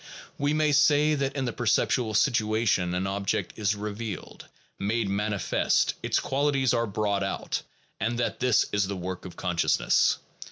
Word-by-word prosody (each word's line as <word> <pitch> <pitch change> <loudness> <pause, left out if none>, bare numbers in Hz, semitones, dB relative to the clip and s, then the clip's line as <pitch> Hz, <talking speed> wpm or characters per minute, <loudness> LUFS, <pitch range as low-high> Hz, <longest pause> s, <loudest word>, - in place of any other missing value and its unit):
We 145 +1 +1
may 155 0 +2
say 145 +1 +4
that 140 -1 -1
in 135 -2 -1
the 120 - -2
perceptual 115 0 +1
situation 110 -7 +2
an 90 +1 -1
object 100 0 -2
is 105 -1 0
revealed, 105 0 -6 0.3
made 110 +2 0
manifest, 100 -1 +1
its - - +1
qualities 135 -2 +1
are 115 0 +1
brought 100 -1 -1
out, 95 0 -2 0.4
and 120 +2 -1
that 120 - -1
this 125 -4 +3
is 100 -2 +1
the 100 0 -4
work 90 +1 -5
of 90 - -9
consciousness. 90 -2 +2
110 Hz, 155 wpm, -27 LUFS, 100-130 Hz, 0.4 s, say